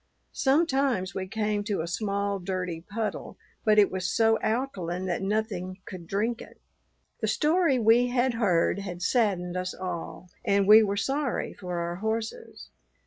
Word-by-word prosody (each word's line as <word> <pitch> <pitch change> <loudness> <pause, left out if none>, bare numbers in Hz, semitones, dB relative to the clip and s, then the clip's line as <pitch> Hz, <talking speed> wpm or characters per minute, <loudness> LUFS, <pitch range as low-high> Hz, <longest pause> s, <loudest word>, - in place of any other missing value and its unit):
Sometimes 270 - +1
we 190 0 -4
came 210 0 -1
to 205 -5 -1
a 165 - -4
small, 200 +2 -1
dirty 180 -2 -3
puddle, 215 0 -4 0.3
but 215 -1 +4
it 205 -1 +5
was 185 0 -2
so 225 +2 +3
alkaline 190 -7 -2
that 175 -2 -2
nothing 195 -2 -2
could 175 -3 -9
drink 220 +6 -1
it. - - -13 0.6
The - - -1
story 315 -2 +2
we 235 +1 +4
had 245 0 +1
heard 195 -5 +2
had 180 -3 -6
saddened 185 -6 +1
us 185 0 -3
all, 180 0 -6
and 200 -1 +2
we 215 +1 +9
were 200 -2 0
sorry 270 +2 -1
for 180 -2 -5
our 170 0 -3
horses. 220 +2 -4
200 Hz, 155 wpm, -27 LUFS, 185-230 Hz, 0.6 s, we